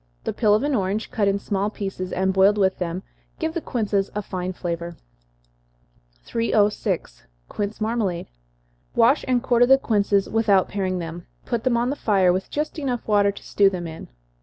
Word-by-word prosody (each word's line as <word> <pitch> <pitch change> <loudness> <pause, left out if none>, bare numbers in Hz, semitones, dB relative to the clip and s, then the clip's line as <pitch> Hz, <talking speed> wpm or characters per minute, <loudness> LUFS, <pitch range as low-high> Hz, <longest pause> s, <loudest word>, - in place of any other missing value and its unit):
The - - -2
peel 210 -3 +3
of 215 - 0
an 290 0 0
orange, 205 -1 -1
cut 205 -3 +1
in 200 0 +2
small 200 0 -1
pieces, 195 -3 -5
and 190 +1 0
boiled 195 +2 +4
with 190 -2 +1
them, 180 +1 -3 0.3
gives 320 -1 -2
the 335 - -2
quinces 205 -7 -1
a 210 - -2
fine 185 -1 -4
flavor. 170 -2 -5 1.3
306. 205 - 0 0.2
Quince 205 +1 -4
Marmalade. 215 -6 -1 0.7
Wash 240 +5 +4
and 250 -2 +1
quarter 245 0 +4
the 270 +1 +7
quinces, 205 -5 +1
without 215 -4 +3
paring 190 -2 -1
them 170 0 -6 0.2
put 235 -2 -2
them 250 -2 +2
on 240 +2 +1
the - - -2
fire, 195 -8 +3
with 185 +1 -3
just 300 +2 -3 0.3
water 205 -1 +3
enough 200 - 0
to - - -11
stew 200 -1 +3
them 180 -3 -5
in. 160 -1 -8
200 Hz, 180 wpm, -23 LUFS, 185-230 Hz, 1.3 s, the